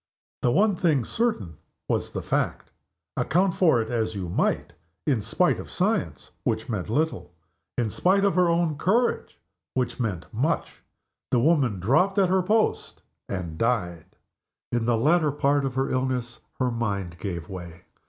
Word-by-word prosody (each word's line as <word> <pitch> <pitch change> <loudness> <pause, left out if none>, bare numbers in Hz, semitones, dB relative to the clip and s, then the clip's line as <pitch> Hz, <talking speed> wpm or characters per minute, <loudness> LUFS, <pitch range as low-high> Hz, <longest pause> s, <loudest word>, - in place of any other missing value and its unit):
The 120 - +2
one 205 - +3
thing 155 -9 +2
certain 110 - -1 0.3
was - - 0
the - - -5
fact - - -1 0.4
account 180 +5 +2
for 160 -10 +4
it 110 - -8
as 110 -2 -1
you 90 -3 -4
might. 85 - 0 0.3
In 130 -7 +1
spite - - +1
of - - -8
science - - -1
(which 110 +1 -1
meant 105 -5 -3
little), 150 - -1 0.4
in 120 -2 +1
spite 195 - +2
of 200 - +3
her 180 0 +3
own 170 -3 +1
courage 235 +6 +1 0.4
(which 130 -1 -1
meant 100 -8 -2
much), 145 +9 -1 0.5
the 125 - +3
woman 130 - +2
dropped 160 - +2
at 190 -2 +4
her 190 0 +3
post 215 +4 0 0.3
and 85 -4 -4
died. 90 -9 -1 0.6
In 120 -1 0
the 120 -1 +3
latter 155 +5 +3
part 140 0 +1
of 130 -2 -3
her 135 +1 0
illness 130 -2 -1 0.2
her 125 -1 +1
mind 100 -7 -3
gave 85 -5 -4
way. 90 -3 -9
125 Hz, 160 wpm, -25 LUFS, 105-170 Hz, 0.6 s, for